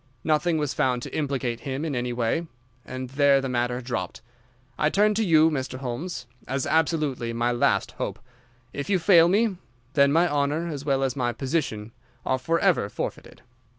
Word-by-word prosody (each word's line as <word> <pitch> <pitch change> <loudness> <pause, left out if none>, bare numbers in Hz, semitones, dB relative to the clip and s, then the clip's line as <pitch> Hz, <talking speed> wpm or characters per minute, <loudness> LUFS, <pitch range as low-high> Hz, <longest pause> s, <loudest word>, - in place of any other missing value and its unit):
Nothing 160 +2 +2
was 150 -2 -1
found 125 -2 0
to - - -7
implicate 135 -5 -2
him 135 +3 -4
in 150 -4 -2
any 125 0 -2
way, 120 +8 -1 0.4
and 130 0 -7
there 140 0 +4
the 135 - -3
matter 125 0 -1
dropped. 120 -5 -4 0.5
I 150 - +2
turn 210 +4 +3
to 220 +2 +1
you, 160 -4 +5
Mr. 130 -3 -3
Holmes, 130 +4 -5 0.2
as 135 0 -1
absolutely 150 -7 0
my 120 +1 0
last 120 - +1
hope. - - -4 0.6
If 140 - -5
you 195 - +3
fail 170 -2 +6
me, 205 0 +2 0.4
then 140 -1 +4
my 165 +4 +4
honour 145 +2 0
as 145 -3 -5
well 135 -2 +1
as 135 0 -1
my 120 -3 -1
position 130 -7 -2 0.3
are 130 - +1
forever 165 - +1
forfeited." - - -6
140 Hz, 175 wpm, -25 LUFS, 125-160 Hz, 0.6 s, fail